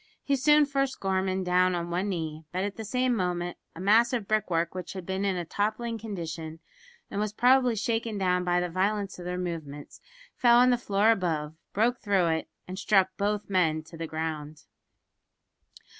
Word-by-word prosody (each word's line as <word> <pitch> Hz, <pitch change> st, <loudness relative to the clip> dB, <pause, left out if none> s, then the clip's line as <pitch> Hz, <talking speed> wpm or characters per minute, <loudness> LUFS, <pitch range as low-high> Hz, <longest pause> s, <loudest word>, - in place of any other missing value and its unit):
He 280 Hz, -, +1 dB
soon 295 Hz, +3 st, +5 dB
forced 275 Hz, -1 st, -1 dB
Gorman 190 Hz, 0 st, 0 dB
down 180 Hz, 0 st, +3 dB
on 170 Hz, 0 st, -3 dB
one 185 Hz, +4 st, -1 dB
knee; 160 Hz, -4 st, -4 dB
but 185 Hz, +1 st, -1 dB
at 205 Hz, 0 st, -3 dB
the 220 Hz, -, -6 dB
same 250 Hz, +3 st, +1 dB
moment 175 Hz, -3 st, -2 dB, 0.2 s
a -, -, -9 dB
mass 225 Hz, +6 st, +4 dB
of 230 Hz, -5 st, -2 dB
brickwork 175 Hz, -6 st, 0 dB
which 185 Hz, -1 st, -6 dB
had 190 Hz, -2 st, -7 dB
been 190 Hz, +2 st, -2 dB
in 195 Hz, -2 st, +1 dB
a 175 Hz, -1 st, -3 dB
toppling 220 Hz, +5 st, -2 dB
condition, 165 Hz, -6 st, -6 dB, 0.5 s
and 200 Hz, -, -3 dB
was 210 Hz, -1 st, -1 dB
probably 250 Hz, +1 st, +4 dB
shaken 225 Hz, 0 st, -1 dB
down 180 Hz, -2 st, +1 dB
by 175 Hz, 0 st, +2 dB
the 180 Hz, -, -1 dB
violence 195 Hz, +2 st, -1 dB
of 175 Hz, -, -8 dB
their 180 Hz, 0 st, -3 dB
movements, 160 Hz, -5 st, -6 dB, 0.3 s
fell 240 Hz, -2 st, +5 dB
on 250 Hz, +1 st, +6 dB
the 245 Hz, -, +3 dB
floor 205 Hz, 0 st, +3 dB
above, 160 Hz, -7 st, -1 dB, 0.2 s
broke 235 Hz, +4 st, +1 dB
through 195 Hz, -4 st, +2 dB
it, 160 Hz, 0 st, -1 dB, 0.2 s
and 185 Hz, +2 st, -6 dB
struck 195 Hz, -3 st, +3 dB
both 205 Hz, 0 st, -1 dB
men 160 Hz, -5 st, +1 dB
to 160 Hz, +1 st, -13 dB
the 165 Hz, 0 st, -5 dB
ground. 155 Hz, -1 st, -5 dB
190 Hz, 190 wpm, -28 LUFS, 175-220 Hz, 0.5 s, on